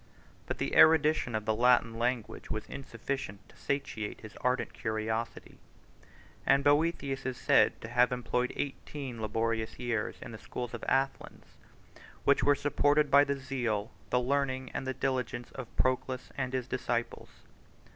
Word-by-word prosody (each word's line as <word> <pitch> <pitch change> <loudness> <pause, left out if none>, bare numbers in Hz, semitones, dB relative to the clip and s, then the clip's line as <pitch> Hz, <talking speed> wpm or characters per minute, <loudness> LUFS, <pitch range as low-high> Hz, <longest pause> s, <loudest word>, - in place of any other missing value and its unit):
But - - -3
the - - -2
erudition 155 -6 +5
of 110 -1 -2
the 110 - +2
Latin 120 0 +4
language 120 -2 -2
was 110 0 -3
insufficient 120 -5 -5
to - - -19
satiate 125 -7 -3
his 110 -1 -11
ardent 125 +1 0
curiosity: 110 +1 -3 0.8
and 140 +1 +4
Boethius 145 -2 +2
is 130 -2 -3
said - - +4
to - - -6
have 125 +1 +3
employed 125 0 -1
eighteen 135 -3 -5
laborious 110 +1 -1
years 120 -3 -2
in - - -8
the 110 - -9
schools 120 -1 -6
of 120 - -6
Athens, 135 0 -1 0.5
91 - - -18 0.2
which - - +4
were 145 0 +5
supported 145 +1 +2
by 140 +1 +8
the 140 0 -1
zeal, 120 -6 -2 0.2
the 125 - +3
learning, 130 0 -1
and 135 - -3
the 130 - -2
diligence 130 -2 -2
of 130 -3 -7
Proclus 130 0 0
and 130 -1 -2
his 130 -2 -1
disciples. 120 -2 -2
125 Hz, 155 wpm, -31 LUFS, 115-135 Hz, 0.8 s, by